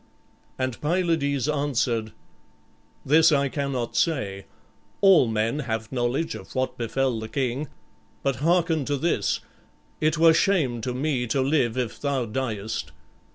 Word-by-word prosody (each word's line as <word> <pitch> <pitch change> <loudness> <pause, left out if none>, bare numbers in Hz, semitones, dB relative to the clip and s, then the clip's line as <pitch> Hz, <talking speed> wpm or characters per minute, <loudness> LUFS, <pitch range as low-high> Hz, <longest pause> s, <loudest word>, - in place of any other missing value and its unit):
And 130 -2 -3
Pylades 150 -5 0
answered, 125 -7 0 0.9
"This 160 +4 +5
I 140 -2 +2
cannot 135 -4 -3
say; 100 - -1 0.5
all 190 -10 +6
men 115 +5 0
have 110 -5 -3
knowledge 125 +5 -1
of - - -10
what 130 0 -1
befell 120 +1 -1
the 110 0 -6
king. 135 +2 -2 0.6
But 135 -1 0
hearken 165 0 +2
to 145 +1 -1
this. 170 +5 0 0.6
It 155 +1 +1
were 165 0 +6
shame 155 - +1
to 125 +2 -3
me 130 -2 -1
to 135 +4 +1
live 130 -4 +1
if 125 -4 -3
thou 140 -4 0
diest. 110 - -3
135 Hz, 135 wpm, -25 LUFS, 120-155 Hz, 0.9 s, all